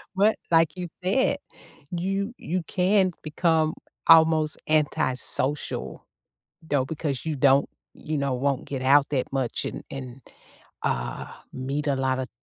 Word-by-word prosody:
But 210 +3 +4 0.2
like 165 0 +4
you 180 - -3 0.2
said, 260 +9 +2 0.5
you 195 +5 -2
you 180 +2 -3
can 185 0 +3
become 160 0 +1 0.3
almost 160 -2 +6
antisocial, 145 - -1 0.6
though, 145 -4 0
because 150 -2 -3
you 155 -2 -1
don't, 135 +1 +4 0.3
you 155 0 -4
know, 140 -1 0
won't 135 +1 0
get 135 -2 -4
out 140 +2 +5
that 135 -3 -1
much 130 -3 -1
and - - -5
and, 130 -1 -8 0.6
uh, - - -2 0.3
meet 140 +3 -3
a 140 - +2
lot 130 0 0
of 130 - -4
150 Hz, 135 wpm, -25 LUFS, 135-165 Hz, 0.6 s, almost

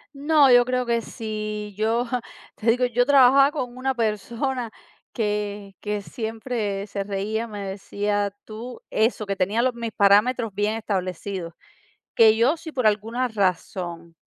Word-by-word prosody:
No, 290 -1 +4
yo 245 0 +7
creo 250 0 0
que 235 -1 +1
si 215 -2 -5
yo, 225 +3 +1 0.5
te 225 - -1
digo, 250 +2 0
yo 245 0 +2
trabajaba 275 0 +6
con 250 -5 -5
una 265 +1 0
persona 235 +3 -2 0.4
que 205 -2 -3
que 210 0 -3
siempre 220 -2 -4
se 200 -1 -3
reía, 210 +3 -2
me 205 -2 -6
decía, 205 +1 -2
tú 230 +3 -9
Eso, 220 0 +1
que 195 -1 -3
tenía 200 +5 +1
los 255 +1 +1
mis 235 -1 -5
parámetros 210 +3 +3
bien 205 +2 0
establecidos, 185 -4 -3 0.6
que 220 -1 +6
yo, 245 +7 +3
si 325 -1 -9
por 255 -6 +1
alguna 225 +4 0
razón 180 -5 -2
220 Hz, 145 wpm, -24 LUFS, 205-245 Hz, 0.6 s, yo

